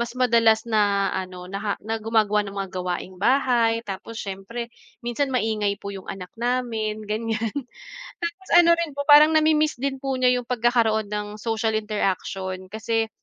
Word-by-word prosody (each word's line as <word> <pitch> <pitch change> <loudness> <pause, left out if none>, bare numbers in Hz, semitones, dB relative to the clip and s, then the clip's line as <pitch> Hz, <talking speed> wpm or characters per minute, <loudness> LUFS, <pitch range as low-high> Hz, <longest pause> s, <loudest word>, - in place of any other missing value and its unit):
mas 235 +1 -3
madalas 230 -3 +4
na 205 -2 +2
ano 185 -1 -5
naha 200 +1 -2
na 225 0 -2
gumagawa 215 -1 +2
ng 200 0 -8
mga 195 -2 -3
gawaing-bahay. 225 +7 +1
Tapos 200 +3 -7
siyempre, 205 +5 -6 0.3
minsan 240 +4 -1
maingay 215 -4 0
po 200 - -7
'yong 190 -1 -9
anak 185 -2 -7
namin, 225 -3 -1
ganiyan. 225 +1 -2 0.7
Tapos 340 +3 -5
ano 345 -1 +7
rin 325 -4 -2
po, 285 - -3
parang 305 +2 +8
nami-miss 310 0 +3
din 275 -1 -1
po 270 -1 -2
niya 255 -1 +3
'yong 245 - -5
pagkakaroon 230 -3 +1
ng 210 0 -3
social 225 -1 -1
interaction, 190 -3 -2
kasi, 220 +1 -1
220 Hz, 155 wpm, -24 LUFS, 200-245 Hz, 0.7 s, parang